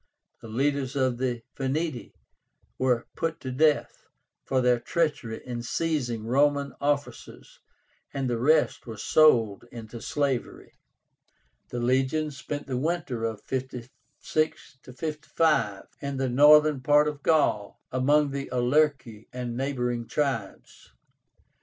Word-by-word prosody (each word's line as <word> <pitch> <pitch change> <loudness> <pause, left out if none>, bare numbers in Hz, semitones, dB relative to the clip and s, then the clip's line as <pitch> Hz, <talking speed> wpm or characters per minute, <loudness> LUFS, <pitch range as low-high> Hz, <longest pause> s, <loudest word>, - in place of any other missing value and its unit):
The - - -10
leaders 135 +3 -1
of 130 -3 0
the 125 -3 -2
Veneti 140 +1 -3 0.6
were 125 -2 +1
put 165 -1 -2
to 130 - -5
death 150 +3 +1 0.4
for 130 - +1
their 125 -1 +3
treachery 145 -7 -2
in 120 -2 -4
seizing 120 -5 -2
Roman 140 +3 +2
officers, 145 0 -3 0.5
and 135 -1 -2
the 120 -2 -1
rest 150 +1 +2
were 110 -2 -7
sold 115 -5 +3
into 115 0 -9
slavery. 140 -4 -2 1.0
The 120 - -4
legions 135 +4 +1
spent 145 +2 -5
the 130 -3 -3
winter 145 -5 -2
of 110 -2 -4
56 130 +3 -4
55 150 -6 -1 0.2
in 140 -1 -4
the 130 -1 0
northern 150 +2 +6
part 150 +3 +4
of 150 -1 -4
Gaul, 140 -11 +1
among 145 +3 +2
the 140 0 -4
Aulerci 125 -3 +1
and 125 -1 -5
neighboring 125 -3 -2
tribes. 135 -9 -3
130 Hz, 120 wpm, -27 LUFS, 120-150 Hz, 1.0 s, northern